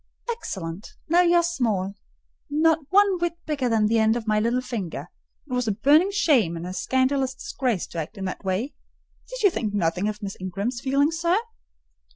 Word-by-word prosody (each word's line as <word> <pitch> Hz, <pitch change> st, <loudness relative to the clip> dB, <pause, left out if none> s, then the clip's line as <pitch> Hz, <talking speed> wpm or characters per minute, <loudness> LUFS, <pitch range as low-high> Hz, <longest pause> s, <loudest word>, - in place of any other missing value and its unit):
"Excellent! 190 Hz, -, -6 dB
Now 345 Hz, +2 st, +5 dB
you 350 Hz, -1 st, +4 dB
are 345 Hz, -, +5 dB
small—not 285 Hz, -, -1 dB
one 395 Hz, -1 st, +4 dB
whit 340 Hz, 0 st, -1 dB
bigger 280 Hz, -5 st, -1 dB
than 220 Hz, -2 st, +3 dB
the 225 Hz, +1 st, +3 dB
end 220 Hz, +1 st, +3 dB
of 235 Hz, -2 st, -3 dB
my 215 Hz, -1 st, +2 dB
little 235 Hz, +3 st, +1 dB
finger. 190 Hz, -, -5 dB, 0.4 s
It 255 Hz, -, -6 dB
was 250 Hz, -1 st, 0 dB
a 210 Hz, -, +2 dB
burning 295 Hz, -, +4 dB
shame 275 Hz, -, +2 dB
and 165 Hz, -, -6 dB
a 180 Hz, -, -5 dB
scandalous 260 Hz, +5 st, 0 dB
disgrace 255 Hz, -, -2 dB
to 170 Hz, -, -5 dB
act 165 Hz, +7 st, -6 dB
in 195 Hz, -, -4 dB
that 185 Hz, -, -5 dB
way. 195 Hz, +9 st, -2 dB, 0.6 s
Did -, -, -6 dB
you 400 Hz, -, +6 dB
think 215 Hz, -9 st, -2 dB
nothing 180 Hz, +1 st, 0 dB
of 210 Hz, 0 st, -7 dB
Miss 195 Hz, -1 st, -4 dB
Ingram's 200 Hz, +7 st, -3 dB
feelings, 285 Hz, +4 st, +1 dB
sir?" 340 Hz, +2 st, +2 dB
240 Hz, 190 wpm, -24 LUFS, 200-315 Hz, 0.6 s, you